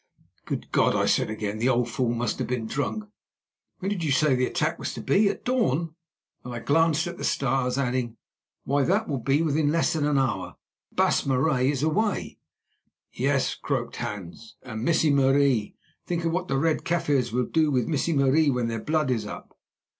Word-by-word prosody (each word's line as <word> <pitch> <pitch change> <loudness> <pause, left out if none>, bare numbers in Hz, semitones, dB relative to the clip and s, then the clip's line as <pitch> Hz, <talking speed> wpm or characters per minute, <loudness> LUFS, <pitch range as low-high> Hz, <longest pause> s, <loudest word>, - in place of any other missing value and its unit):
"Good - - -5
God!" - - +3
I - - +2
said - - +2
again, 110 -1 -4
"the 120 +3 +2
old 120 -1 +2
fool 120 0 -1
must 120 +1 -2
have - - -2
been 125 -2 -2
drunk. 145 - -2 0.7
When 190 - -3
did 185 -5 -2
you 150 - 0
say 145 +1 +3
the 125 0 +1
attack 160 -2 -1
was - - -4
to - - -6
be—at 200 0 +1
dawn?" 170 - 0 0.5
and 125 - -7
I 120 - -5
glanced 160 +5 +2
at 175 0 -6
the - - -5
stars, 130 -1 0
adding, 125 -3 -1 0.5
"Why, 140 +1 +1
that 200 +10 +1
will 140 -3 -2
be 140 +6 +1
within 150 -1 +1
less 165 +1 +1
than 150 -2 0
an 145 -1 +2
hour, 95 -9 -1 0.3
and - - -29
the - - +5
Baas - - +2
Marais 130 0 +2
is 140 -1 -1
away." 200 +7 -1 0.7
"Yes," - - +1
croaked - - -3
Hans; 105 +3 -7
"and 110 -3 -6
Missie 160 -1 +3
Marie—think 140 +4 0
of 165 - +1
what 180 +2 -2
the 135 - 0
Red 160 +2 +1
Kaffirs 145 -9 0
will 125 +1 0
do 160 -1 +2
with 125 -5 +1
Missie 160 +2 0
Marie 140 +2 +3
when 125 -3 0
their 115 -1 -3
blood 155 -1 0
is 110 -4 -1
up." - - -9
140 Hz, 195 wpm, -26 LUFS, 125-160 Hz, 0.7 s, the